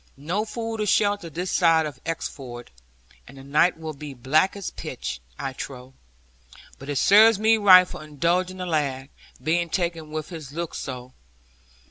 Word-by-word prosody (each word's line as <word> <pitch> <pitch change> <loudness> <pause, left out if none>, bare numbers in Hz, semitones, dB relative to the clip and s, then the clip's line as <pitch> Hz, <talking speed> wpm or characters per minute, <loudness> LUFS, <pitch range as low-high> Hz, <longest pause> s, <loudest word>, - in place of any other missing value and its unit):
No 175 +10 -2
food 225 0 -4
or 210 - -1
shelter 205 -3 +1
this 180 +4 -4
side 165 -2 +4
of 145 -4 -8
Exeford, 130 -7 -6 0.6
and 135 - -14
the 135 - -11
night 150 +6 +2
will 160 -1 -6
be 145 -1 -9
black 155 +10 +2
as 200 -2 -5
pitch, - - -6 0.2
I 135 - -4
trow. 130 -1 -8 0.9
But 140 - -10
it 145 - -2
serves 215 - +6
me 220 +2 +4
right 185 -3 +8
for 155 - -9
indulging 170 +5 -1
the 180 - -4
lad, 140 -5 -2 0.3
being 170 +2 +1
taken 170 -3 -2
with 155 0 -5
his 155 -6 -9
looks 170 +1 -4
so.' 125 -1 -7
160 Hz, 165 wpm, -24 LUFS, 140-185 Hz, 0.9 s, right